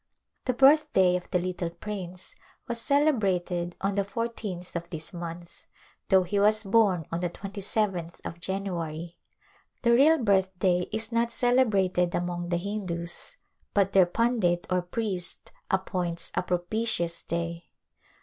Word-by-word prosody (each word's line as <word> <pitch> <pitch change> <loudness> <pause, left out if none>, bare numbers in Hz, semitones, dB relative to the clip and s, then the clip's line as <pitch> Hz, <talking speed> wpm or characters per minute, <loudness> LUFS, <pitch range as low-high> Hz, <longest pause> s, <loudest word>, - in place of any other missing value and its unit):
The 255 - +1
birthday 265 -10 +5
of 180 - -4
the - - +2
little 180 -1 -2
prince 185 -1 -7 0.3
was 235 -2 -2
celebrated 195 - +1
on 195 +1 0
the 200 0 +1
fourteenth 205 -5 -5
of 170 0 -4
this 160 +2 -6
month, 170 0 -8 0.5
though 190 -1 +6
he 200 +3 -1
was 215 +2 +4
born 195 -5 +3
on 165 - -1
the 175 - 0
27th 195 -3 -2
of 170 - -6
January. 170 -3 -4 0.6
The 235 - +5
real 295 +6 +6
birthday 190 - +2
is 220 +1 -2
not 235 0 +1
celebrated 200 -8 +2
among 175 0 -2
the 175 - +1
Hindus 180 - -5 0.4
but 195 -1 +3
their 190 -2 +6
pundit 190 -4 +1
or 180 0 +2
priest 185 -1 -4 0.2
appoints 180 -3 -2
a - - +1
propitious 180 -1 -1
day. 170 0 -4
185 Hz, 135 wpm, -27 LUFS, 175-215 Hz, 0.6 s, though